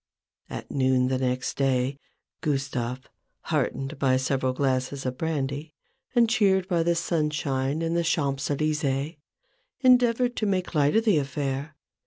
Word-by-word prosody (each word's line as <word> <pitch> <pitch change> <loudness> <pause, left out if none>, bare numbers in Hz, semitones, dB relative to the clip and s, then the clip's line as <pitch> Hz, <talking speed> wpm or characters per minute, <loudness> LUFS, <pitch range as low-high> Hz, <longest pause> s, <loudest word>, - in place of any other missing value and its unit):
At - - -7
noon 130 -2 +2
the 130 -1 0
next 130 0 -1
day, 135 0 +1 0.4
Gustave, 135 -3 -2 0.4
heartened 135 +1 -2
by 130 -2 +3
several 130 0 0
glasses 130 +1 -1
of 130 0 -2
brandy, 150 -1 -3 0.4
and 235 -1 +5
cheered 195 -5 +3
by 175 -4 +1
the 170 +1 +2
sunshine 150 -3 -1
in 165 0 0
the 170 0 +1
Champs 140 -5 0
Elysecs, 150 0 -1 0.6
endeavoured 245 -1 +4
to 215 - 0
make 185 -3 -1
light 145 +1 +3
of 225 +1 +3
the 200 -9 +4
affair. 140 +1 -3
145 Hz, 140 wpm, -26 LUFS, 135-170 Hz, 0.6 s, and